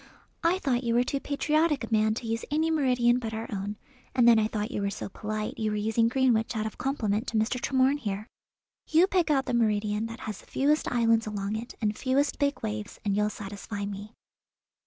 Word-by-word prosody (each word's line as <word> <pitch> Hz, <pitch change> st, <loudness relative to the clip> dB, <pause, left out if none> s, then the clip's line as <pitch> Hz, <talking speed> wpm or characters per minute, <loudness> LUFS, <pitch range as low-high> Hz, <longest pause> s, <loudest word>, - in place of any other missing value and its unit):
"I 340 Hz, +2 st, +3 dB
thought 265 Hz, -8 st, 0 dB
you 235 Hz, -1 st, +1 dB
were 245 Hz, -, +4 dB
too 275 Hz, +2 st, -2 dB
patriotic 300 Hz, +1 st, +1 dB
a 230 Hz, -, -6 dB
man 215 Hz, 0 st, +3 dB
to 235 Hz, -, -5 dB
use 225 Hz, 0 st, -2 dB
any 315 Hz, +2 st, +1 dB
meridian 250 Hz, -5 st, +3 dB
but 225 Hz, -2 st, -4 dB
our 225 Hz, +1 st, -4 dB
own, 205 Hz, +1 st, -4 dB, 0.4 s
and 245 Hz, -2 st, +5 dB
then 230 Hz, -2 st, +7 dB
I 215 Hz, -, +2 dB
thought 215 Hz, +2 st, -3 dB
you 205 Hz, -, -2 dB
were 200 Hz, -, 0 dB
so 200 Hz, -, -5 dB
polite 215 Hz, +2 st, -4 dB
you 220 Hz, -1 st, 0 dB
were 210 Hz, -, -1 dB
using 220 Hz, +2 st, +2 dB
Greenwich 245 Hz, -2 st, +2 dB
out 215 Hz, -, -1 dB
of 220 Hz, -, -6 dB
compliment 230 Hz, -4 st, -1 dB
to 225 Hz, -, -1 dB
Mr. 230 Hz, +3 st, 0 dB
Tremorne 265 Hz, +2 st, +2 dB
here. 205 Hz, -4 st, -3 dB, 0.6 s
You 325 Hz, +3 st, +5 dB
pick 365 Hz, -4 st, +1 dB
out 270 Hz, -3 st, +2 dB
the -, -, -2 dB
meridian 215 Hz, -1 st, +1 dB
that 230 Hz, 0 st, -9 dB
has 215 Hz, -3 st, -5 dB
the -, -, -21 dB
fewest 295 Hz, +3 st, +1 dB
islands 230 Hz, -2 st, +3 dB
along 205 Hz, 0 st, -3 dB
it 230 Hz, +3 st, -6 dB
and 210 Hz, -1 st, 0 dB
fewest 275 Hz, +4 st, 0 dB
big 285 Hz, 0 st, 0 dB
waves, 105 Hz, 0 st, -4 dB
and 200 Hz, -1 st, +1 dB
you'll 210 Hz, +1 st, +2 dB
satisfy 205 Hz, 0 st, -6 dB
me." 205 Hz, +2 st, -7 dB
230 Hz, 220 wpm, -28 LUFS, 210-265 Hz, 0.6 s, then